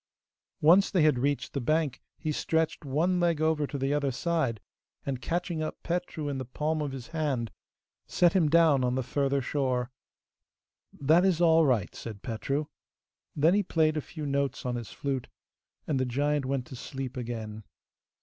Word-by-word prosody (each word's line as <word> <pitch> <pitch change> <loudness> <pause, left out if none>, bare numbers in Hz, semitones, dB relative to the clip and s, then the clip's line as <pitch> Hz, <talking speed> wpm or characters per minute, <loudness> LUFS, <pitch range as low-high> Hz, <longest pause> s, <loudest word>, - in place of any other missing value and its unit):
Once 175 +6 +6
they 180 -6 +2
had 150 -5 +4
reached 135 +1 -1
the 140 - -2
bank 155 +1 0 0.2
he 155 - -2
stretched 160 +2 0
one 160 +6 +1
leg 170 -3 +2
over 155 -2 +1
to 140 - -4
the 135 +1 0
other 145 -2 +1
side, 135 - -1 0.5
and, 130 -2 -3
catching 170 +3 -2
up 155 - -5
Petru 170 -3 -2
in 140 -2 -2
the - - -3
palm 155 +5 -2
of 145 -2 -2
his 130 -2 -8
hand, 145 -8 -1 0.6
set 175 -2 +3
him 170 -6 +3
down 160 -4 +5
on 125 0 +1
the 130 - 0
further 140 +1 0
shore. 125 -2 -1 1.0
'That 160 +6 +3
is 185 -4 +3
all 165 -2 +5
right,' 115 -8 +1
said 110 -4 -8
Petru. 135 +6 -2 0.7
Then 155 +4 +4
he 205 - +4
played 160 -5 +1
a 155 - 0
few 155 +1 -7
notes 140 -2 -1
on 125 - -1
his 120 -2 -5
flute, 135 -3 -3 0.6
and 140 -4 0
the 130 - +1
giant 145 +2 0
went 135 -2 -1
to 130 - -9
sleep 130 0 -6
again. 110 -3 -5
145 Hz, 180 wpm, -29 LUFS, 130-160 Hz, 1.0 s, Once